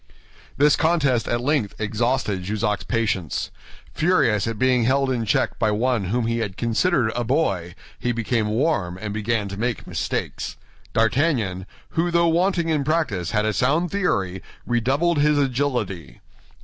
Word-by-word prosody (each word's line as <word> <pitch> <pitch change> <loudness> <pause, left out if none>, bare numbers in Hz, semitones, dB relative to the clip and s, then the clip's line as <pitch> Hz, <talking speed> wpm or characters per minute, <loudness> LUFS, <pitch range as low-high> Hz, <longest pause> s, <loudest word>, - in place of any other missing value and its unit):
This 145 +1 +5
contest 145 -7 +1
at 120 0 0
length 130 -6 0
exhausted 110 -2 0
Jussac's 105 +2 -1
patience. 100 - -1 0.4
Furious 115 - +2
at 115 -1 -3
being 125 -1 +3
held 135 +1 +2
in 120 -3 -1
check 110 - 0
by 110 - +2
one 115 0 +1
whom 115 +5 0
he 115 +1 0
had 105 -4 -3
considered 120 +1 +1
a 120 - 0
boy, 100 - 0 0.2
he 125 - 0
became 115 -1 0
warm 105 - 0
and 105 +1 -4
began 110 0 -1
to 100 - -6
make 120 0 -2
mistakes. - - -3 0.4
D'Artagnan, 115 - +1 0.2
who 170 +2 0
though 170 0 +3
wanting 170 0 +1
in 150 -3 +1
practice 145 - 0
had 105 -1 +1
a 110 - +1
sound 155 - +1
theory, 95 - -1 0.2
redoubled 135 +8 +1
his 150 0 +3
agility. 120 - -1
120 Hz, 150 wpm, -23 LUFS, 105-145 Hz, 0.4 s, This